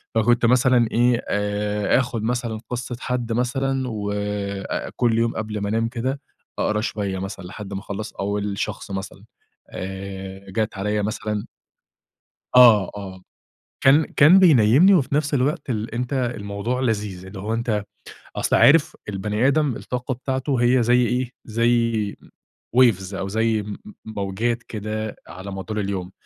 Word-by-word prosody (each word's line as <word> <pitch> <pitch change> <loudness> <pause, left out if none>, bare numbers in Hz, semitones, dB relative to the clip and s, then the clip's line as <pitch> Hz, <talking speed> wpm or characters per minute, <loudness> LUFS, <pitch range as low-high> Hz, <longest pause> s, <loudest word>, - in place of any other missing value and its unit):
فكنت 120 +2 +3
مثلًا 125 -1 +4
إيه، 120 0 +3
آآ 105 +1 +1
آخد 120 -4 -2
مثلًا 120 -2 -2
قصة 125 0 -4
حد 125 -2 -3
مثلًا، 135 +3 0
و 105 -2 -3
أ 100 -1 -3
كل 115 -2 +2
يوم 115 0 0
قبل 105 -1 -3
ما 100 - -2
أنام 115 +2 +1
كده، 130 +4 -3 0.4
أقرا 105 0 +1
شوية 100 -4 -3
مثلًا 95 -1 -6
لحد 100 +1 -8
ما 95 - -3
أخلَّص 105 +1 -6
أول 100 0 -2
شخص - - -4
مثلًا، 95 0 -6 0.5
آآ 95 0 -7
جات 110 0 -2
عليَّ 105 +1 -1
مثلًا 105 0 -3 1.1
آه، 115 -6 +7
آه 95 -2 -8 0.6
كان 145 +4 +5
كان 160 +7 +6
بينيمني 155 - +6
وفي 140 -5 +1
نفس 150 0 +1
الوقت 135 +1 0
ال 110 0 -3
أنتَ 125 +3 -3
الموضوع 120 -2 -2
لذيذ، 105 -6 -2
اللي 95 +1 -9
هو 105 +4 -2
أنتَ 110 -3 -1 0.5
أصل - - +1
عارف 155 +1 +5
البني 105 +4 0
آدم 140 -2 +2
الطاقة 125 +3 -4
بتاعته 130 0 -2
هي 120 0 +4
زي 125 +1 +4
إيه؟ 125 0 -1
زي 115 -2 +1 0.6
Waves 100 -7 +4
أو 95 0 -3
زي 110 +1 +1
م 105 0 -7
م 215 - -10
موجات 110 +3 -2
كده 110 0 -4
على 95 +2 -8
مدار 105 +3 -4
اليوم. 95 -2 -3
110 Hz, 150 wpm, -22 LUFS, 100-125 Hz, 1.1 s, آه